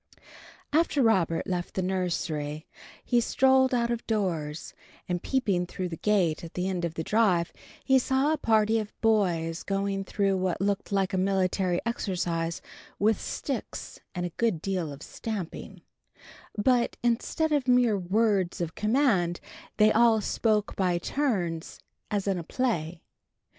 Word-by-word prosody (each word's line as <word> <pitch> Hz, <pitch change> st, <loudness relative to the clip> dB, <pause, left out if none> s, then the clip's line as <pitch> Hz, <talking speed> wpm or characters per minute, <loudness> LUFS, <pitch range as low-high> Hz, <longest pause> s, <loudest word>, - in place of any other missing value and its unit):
V. -, -, -30 dB, 0.5 s
After 305 Hz, -3 st, +3 dB
Robert 180 Hz, -7 st, +2 dB
left 180 Hz, -3 st, -3 dB
the 190 Hz, -, 0 dB
nursery 165 Hz, -5 st, -2 dB, 0.4 s
he 240 Hz, -1 st, +3 dB
strolled 265 Hz, +2 st, +3 dB
out 240 Hz, -1 st, +1 dB
of 235 Hz, -1 st, -2 dB
doors, 165 Hz, -8 st, -2 dB, 0.3 s
and, 180 Hz, -1 st, -2 dB
peeping 200 Hz, -10 st, 0 dB
through 180 Hz, 0 st, -4 dB
the 165 Hz, -, -5 dB
gate 180 Hz, -7 st, +1 dB
at 165 Hz, -, -9 dB
the 180 Hz, +1 st, -1 dB
end 180 Hz, -2 st, -2 dB
of 165 Hz, -1 st, -2 dB
the 160 Hz, -, -3 dB
drive, 190 Hz, -5 st, +2 dB, 0.3 s
he 265 Hz, 0 st, +5 dB
saw 265 Hz, +4 st, +1 dB
a -, -, 0 dB
party 220 Hz, -2 st, +3 dB
of 215 Hz, -1 st, -7 dB
boys 175 Hz, -7 st, +1 dB
going 195 Hz, 0 st, -1 dB
through 195 Hz, 0 st, 0 dB
what 185 Hz, -1 st, -1 dB
looked 200 Hz, +1 st, -1 dB
like 195 Hz, -1 st, +1 dB
a 190 Hz, -, +1 dB
military 185 Hz, -1 st, +1 dB
exercise 175 Hz, -7 st, -2 dB, 0.3 s
with 215 Hz, +1 st, +2 dB
sticks 265 Hz, -6 st, -5 dB, 0.2 s
and 175 Hz, 0 st, -2 dB
a 175 Hz, -, -4 dB
good 225 Hz, -8 st, +1 dB
deal 180 Hz, -3 st, -2 dB
of 140 Hz, +2 st, -9 dB
stamping; 205 Hz, -7 st, -6 dB, 0.7 s
but, 240 Hz, +3 st, +2 dB
instead 240 Hz, +7 st, 0 dB
of 285 Hz, -3 st, +1 dB
mere 245 Hz, -3 st, +4 dB
words 195 Hz, 0 st, +1 dB
of 165 Hz, -2 st, -3 dB
command, 210 Hz, -7 st, +1 dB, 0.4 s
they 215 Hz, 0 st, +5 dB
all 230 Hz, 0 st, +5 dB
spoke 210 Hz, 0 st, 0 dB
by 180 Hz, -2 st, +1 dB
turns, 175 Hz, -, -2 dB, 0.3 s
as 205 Hz, -2 st, -1 dB
in 190 Hz, -2 st, +1 dB
a -, -, -5 dB
play. 170 Hz, -7 st, -2 dB
195 Hz, 155 wpm, -27 LUFS, 175-230 Hz, 0.7 s, he